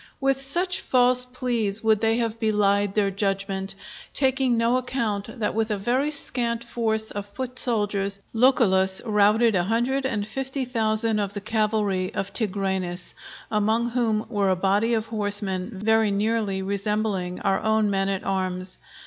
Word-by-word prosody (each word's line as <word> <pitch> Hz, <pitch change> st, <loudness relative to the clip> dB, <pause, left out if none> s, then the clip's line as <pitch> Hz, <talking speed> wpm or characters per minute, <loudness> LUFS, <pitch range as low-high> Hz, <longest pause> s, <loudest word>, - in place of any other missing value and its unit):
With 270 Hz, -1 st, +1 dB
such 350 Hz, +7 st, 0 dB
false 250 Hz, 0 st, +4 dB
pleas 235 Hz, -5 st, -2 dB
would 220 Hz, -1 st, +3 dB
they 225 Hz, 0 st, +2 dB
have 230 Hz, -1 st, -2 dB
belied 205 Hz, -2 st, +1 dB
their 200 Hz, -2 st, +2 dB
judgment, 195 Hz, -1 st, -2 dB, 0.4 s
taking 265 Hz, -3 st, +2 dB
no 230 Hz, +2 st, +2 dB
account 235 Hz, -4 st, -3 dB
that 210 Hz, -, -1 dB
with 225 Hz, 0 st, -1 dB
a 210 Hz, -, -1 dB
very 250 Hz, +8 st, 0 dB
scanty 235 Hz, -5 st, 0 dB
force 220 Hz, -2 st, 0 dB
of 205 Hz, 0 st, -5 dB
foot 255 Hz, +4 st, -5 dB
soldiers, 205 Hz, -4 st, 0 dB
Lucullus 195 Hz, -6 st, +3 dB
routed 215 Hz, +1 st, +3 dB
a 175 Hz, -2 st, +1 dB
hundred 250 Hz, +6 st, 0 dB
and 210 Hz, -5 st, -3 dB
fifty 265 Hz, +3 st, -3 dB
thousand 220 Hz, -2 st, 0 dB
of 200 Hz, 0 st, -3 dB
the -, -, -2 dB
cavalry 210 Hz, -3 st, 0 dB
of 195 Hz, 0 st, -3 dB
Tigranes, 190 Hz, -4 st, -1 dB, 0.4 s
among 220 Hz, +3 st, +1 dB
whom 225 Hz, -3 st, 0 dB
were 205 Hz, -4 st, 0 dB
a 185 Hz, -, +3 dB
body 200 Hz, +5 st, +1 dB
of 220 Hz, -1 st, -1 dB
horsemen 205 Hz, -3 st, -1 dB
very 220 Hz, +1 st, +2 dB
nearly 205 Hz, -1 st, -1 dB
resembling 200 Hz, -2 st, -2 dB
our 195 Hz, -1 st, +1 dB
own 220 Hz, -1 st, +1 dB
men 195 Hz, 0 st, 0 dB
at 195 Hz, -1 st, -2 dB
arms. 185 Hz, -1 st, -3 dB
215 Hz, 155 wpm, -24 LUFS, 200-235 Hz, 0.4 s, false